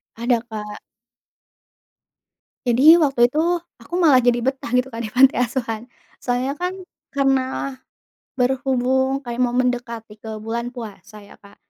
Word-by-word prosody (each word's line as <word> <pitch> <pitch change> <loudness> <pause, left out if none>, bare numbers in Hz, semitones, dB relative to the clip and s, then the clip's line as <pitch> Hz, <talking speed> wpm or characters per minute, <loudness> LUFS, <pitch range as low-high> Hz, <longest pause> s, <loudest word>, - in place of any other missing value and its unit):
Ada, 235 +1 +1
Kak. 210 -2 -7 1.9
Jadi, 240 +2 +2 0.2
waktu 270 -5 +4
itu, 275 +6 0 0.4
aku - - -16
malah 295 -8 +5
jadi 240 0 +3
betah, 265 -3 -2
gitu 250 +1 +1
kan, 230 - -4
di 215 - -4
panti 260 +4 +5
asuhan. 235 -3 -2 0.4
Soalnya 250 +2 -1
kan, 360 +1 -1 0.4
karena 270 -1 +2 1.0
berhubung 265 +1 +1
kayak 240 +1 -4
mau 245 0 +1
mendekati 235 -4 -2
ke 220 - -9 0.2
bulan 235 +2 -3
puasa, 215 -4 -10
ya, - - -17
Kak. 200 0 -18
245 Hz, 135 wpm, -21 LUFS, 230-265 Hz, 1.9 s, malah